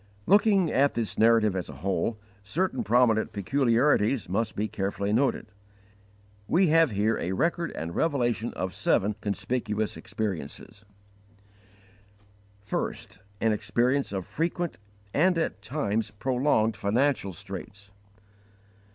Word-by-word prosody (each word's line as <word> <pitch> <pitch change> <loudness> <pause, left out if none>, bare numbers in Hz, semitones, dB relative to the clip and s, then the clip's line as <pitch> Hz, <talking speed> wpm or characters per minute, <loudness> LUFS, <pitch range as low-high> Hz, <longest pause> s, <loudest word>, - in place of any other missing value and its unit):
Looking 200 -3 +4
at 140 +2 +2
this 115 -3 -3
narrative 110 -3 +4
as 90 -4 -3
a - - -7
whole, 100 +4 0 0.3
certain 185 - -1
prominent 120 - +3
peculiarities 120 - +2
must 110 +5 -1
be 105 +2 -1
carefully 100 0 -2
noted. 135 0 +1 1.0
We 180 0 +3
have 165 -1 +5
here 105 +1 0
a 90 +2 -2
record 170 - 0
and 80 +2 -5
revelation 120 -7 0
of 95 -1 -3
seven 105 +5 +1
conspicuous 105 +1 -2
experiences: 100 0 -5 1.8
1. - - -1 0.5
An 115 - +3
experience 120 +6 0
of 95 -3 -3
frequent 170 -1 -2 0.3
and 180 +4 +3
at 160 -10 -2
times 110 -3 -2
prolonged 125 0 +1
_financial 105 +2 0
straits. 100 +3 -9
110 Hz, 115 wpm, -27 LUFS, 100-140 Hz, 1.8 s, have